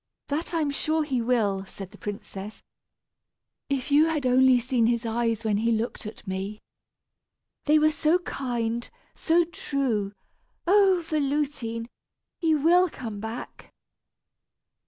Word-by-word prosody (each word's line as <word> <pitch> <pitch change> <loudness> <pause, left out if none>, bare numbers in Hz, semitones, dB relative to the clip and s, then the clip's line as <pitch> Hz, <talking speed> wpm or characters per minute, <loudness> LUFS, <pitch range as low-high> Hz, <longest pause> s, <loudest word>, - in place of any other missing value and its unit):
"That 300 +4 -2
I 335 -2 0
am 290 -2 0
sure 310 +2 0
he 265 -5 -1
will!" 220 -5 +1
said 190 -1 -9
the - - -14
princess. 205 0 -7 1.1
"If 275 0 -2
you 295 +2 +6
had 310 -4 -1
only 255 0 +5
seen 240 -1 +1
his 235 0 0
eyes 230 0 0
when 215 -2 +1
he 230 +2 +1
looked 225 0 -2
at 215 - -10
me! 195 +2 -4 1.1
They 305 +1 +5
were 310 0 +4
so 315 +2 +3
kind, 240 -8 -3 0.2
so 340 +1 +3
true! 260 -11 -2 0.5
Oh! 385 -2 +4
Véloutine! 280 -6 -1 0.5
he 325 -3 +3
will 345 +5 +4
come 225 -8 -7
back!" 220 +3 -7
255 Hz, 135 wpm, -26 LUFS, 225-305 Hz, 1.1 s, you